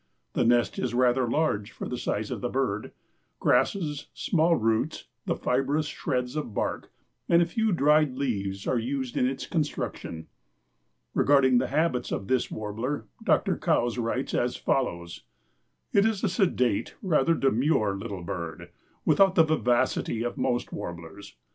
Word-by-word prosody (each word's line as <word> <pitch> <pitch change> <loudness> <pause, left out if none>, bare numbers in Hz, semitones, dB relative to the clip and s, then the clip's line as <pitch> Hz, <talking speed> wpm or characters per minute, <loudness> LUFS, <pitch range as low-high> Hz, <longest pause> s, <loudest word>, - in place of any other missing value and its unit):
The - - +1
nest 120 0 +2
is 120 -2 -2
rather 125 0 +3
large 115 -8 0
for - - -7
the 125 - -3
size 110 -3 -2
of - - -4
the 125 - -1
bird. 125 -6 -2 0.5
Grasses, 150 +3 +1
small 170 -2 +2
roots, 115 +6 0 0.2
the - - +1
fibrous 135 +4 0
shreds 125 -3 -2
of 145 -9 -4
bark - - -2 0.4
and 170 - +6
a 170 - +4
few 220 +6 0
dried 150 -4 +3
leaves 100 -8 -2
are 125 - +1
used 130 +1 -3
in 125 - +2
its 135 +1 -3
construction. 145 - -3 0.9
Regarding 130 -3 +4
the - - -1
habits 155 -6 0
of 95 - -3
this 130 -2 +1
warbler 110 +4 -4 0.2
Dr. - - +2
Coues 120 0 +1
writes 120 +3 -2
as 120 0 0
follows: 85 -10 -2 0.7
"It 200 - +5
is 220 -2 0
a 210 - +2
sedate, 170 - +1
rather 165 -4 +3
a - - -3
demure, 120 -5 +2
little 100 -2 -6
bird, 85 0 -6 0.3
without 195 -1 +4
the 165 - +7
vivacity 125 -6 +1
of 120 - -3
most 120 0 -1
warblers. 85 0 -8
125 Hz, 155 wpm, -27 LUFS, 110-150 Hz, 0.9 s, the